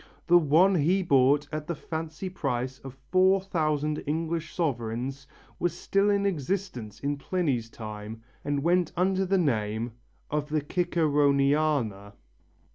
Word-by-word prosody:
The 175 0 +6
one 170 +5 +4
he 180 +4 +2
bought 140 -2 +3
at 155 0 -4
the 170 - -2
fancy 160 +4 -5
price 130 -7 -3
of 135 -1 -10
4000 170 -6 +2
English 160 +1 -2
sovereigns 135 -2 -3 0.3
was 175 -1 -1
still 195 +2 +1
in 200 -1 +2
existence 165 - -3
in 145 +1 -1
Pliny's 140 -8 -1
time 110 0 -8 0.2
and 145 -1 -1
went 175 0 +2
under 190 +1 +2
the 195 +1 +2
name 115 - 0 0.4
of 150 0 -1
the 155 0 0
Ciceroniana. 145 - +1
150 Hz, 125 wpm, -27 LUFS, 135-175 Hz, 0.4 s, The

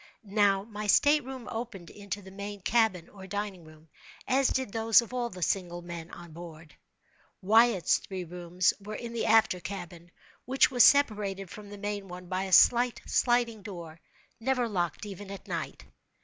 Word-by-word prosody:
Now, 200 -1 +2
my 210 -1 -6
state 290 +7 +4
room 260 -1 -8
opened 225 -7 -6
into 205 0 -7
the 190 - -12
main 200 +1 -7
cabin, 215 -5 +1
or 190 -2 -12
dining 200 -3 -5
room, 155 0 -17 0.4
as 265 0 +3
did 260 -5 -1
those 225 0 +4
of 235 +1 -4
all 245 -1 -1
the 180 -3 -6
single 175 -1 -2
men 170 -1 -8
on 170 -1 -11
board. 165 -1 -11 0.7
Wyatt's 220 -3 +4
three 190 -2 -6
rooms 180 +1 0
were 210 +2 -7
in 235 +1 -6
the 230 - -1
after 220 -4 +4
cabin, 175 -1 -8 0.4
which 265 +2 +3
was 245 -3 +5
separated 205 -9 +3
from 210 -1 -10
the 205 - -9
main 205 -1 -4
one 180 0 -9
by 185 +1 -2
a 190 - -6
slight 240 +5 +5
sliding 240 -3 +1
door, 170 -5 -9 0.4
never 250 0 0
locked 175 -3 -2
even 200 -1 -8
at 200 -1 -9
night. - - -5
200 Hz, 175 wpm, -29 LUFS, 180-225 Hz, 0.7 s, was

